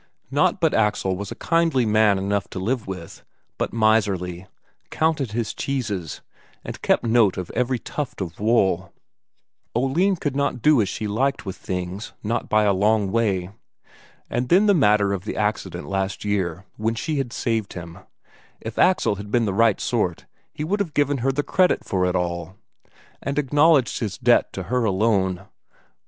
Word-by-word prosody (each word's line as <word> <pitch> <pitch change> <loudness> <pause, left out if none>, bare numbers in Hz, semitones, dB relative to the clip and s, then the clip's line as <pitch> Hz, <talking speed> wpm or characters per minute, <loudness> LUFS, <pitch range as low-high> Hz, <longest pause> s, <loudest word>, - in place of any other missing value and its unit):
Not - - +2
but 165 -3 +2
Axel 105 -3 +1
was 100 +1 -6
a - - -5
kindly 165 -7 +1
man 105 -2 +4
enough 100 +1 -1
to - - -6
live 115 +4 -2
with, 90 -3 -8 0.4
but - - -1
miserly; 100 -5 +1 0.4
counted 150 -8 0
his 115 -1 -2
cheeses, 105 - -3 0.4
and - - -7
kept - - +2
good 115 - -1
note 115 -5 +4
of 90 -2 -5
every 125 +1 0
tuft 145 +4 -5
of 85 -4 -5
wool; 95 -5 +2 0.8
Oline 155 +11 +2
could 145 -5 -3
not 140 -4 -1
do 150 -5 +5
as 100 - -1
she 110 - -4
liked 135 +7 -1
with 95 -1 -5
things, 95 +4 -5
not 115 +3 -2
by 110 0 +3
a 100 -1 +3
long 105 0 +2
way. 100 -5 0 0.8
And 125 +1 -2
then 190 +4 +5
that 205 - +5
matter 105 - +3
of 95 -2 -4
the 105 - -5
accident 105 -4 -2
last 95 +1 -2
year, 95 -3 -1
when 110 +2 -1
she 150 +6 -2
had 130 -3 -3
saved 115 -4 -2
him 85 0 -9 0.6
if 115 0 -7
Axel 180 - +3
had 100 +1 -8
been 115 +2 +2
the 100 - -1
right 110 0 +3
sort, - - -1 0.3
he 150 - -5
would 195 +7 -1
have 170 -7 -3
given 145 -1 +1
her 135 +3 +1
the 145 +2 -1
credit 185 +3 +2
for 90 -1 0
it 90 - -1
all, 85 0 -2 0.7
and 140 +1 -3
acknowledged 145 -1 +3
his 105 -5 -3
debt 120 -1 +3
to 95 - -4
her 125 +7 0
alone. 95 -3 +1
110 Hz, 175 wpm, -23 LUFS, 95-130 Hz, 0.8 s, do